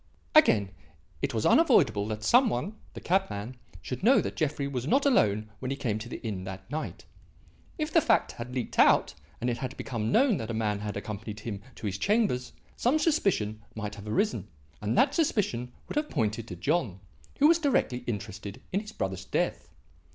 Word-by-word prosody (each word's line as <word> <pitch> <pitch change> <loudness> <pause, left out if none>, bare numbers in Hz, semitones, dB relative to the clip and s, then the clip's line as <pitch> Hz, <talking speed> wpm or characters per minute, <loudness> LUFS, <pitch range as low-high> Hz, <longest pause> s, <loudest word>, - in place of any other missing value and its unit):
"Again; 105 - +5 0.5
it - - 0
was - - -1
unavoidable 100 0 +4
that 110 0 -4
some 245 - +5
one 160 - -3 0.2
the - - -5
cabman 130 - -1 0.3
should 125 - -5
know 250 +7 +6
that - - -3
Jeffrey 145 -2 -1
was 130 -2 -3
not 275 - +3
alone 110 - +2
when 130 - -4
he 135 - -2
came 110 -6 -1
to 115 +2 -8
the - - -6
inn 100 -4 -3
that 95 0 -8
night. 155 +1 -5 0.7
If 310 -1 -3
the 330 - +6
fact 225 -6 +2
had 120 +1 -7
leaked 125 -3 -3
out - - +5 0.3
and 120 - -2
it 120 -1 -1
had 130 +1 -5
become 115 -2 -3
known 250 - +4
that 110 - -5
a 115 - -2
man 105 -2 0
had 105 0 -4
accompanied 105 +1 -6
him 105 -4 -5
to 110 - -8
his 100 -1 -2
chambers, 205 - +1 0.2
some 255 +6 +2
suspicion 195 - +1
might 105 -1 -4
have 105 0 -10
arisen, 110 - 0 0.3
and 105 +3 -1
that 275 +1 +4
suspicion 195 - 0 0.2
would - - -5
have 300 0 0
pointed 110 +1 -1
to 90 - -6
John, 120 - 0 0.4
who 290 - +6
was 335 +1 +5
directly 275 - +1
interested 105 -2 -5
in 195 - +1
his 215 +1 -9
brother's 95 0 -3
death. - - -1
120 Hz, 195 wpm, -28 LUFS, -, 0.7 s, know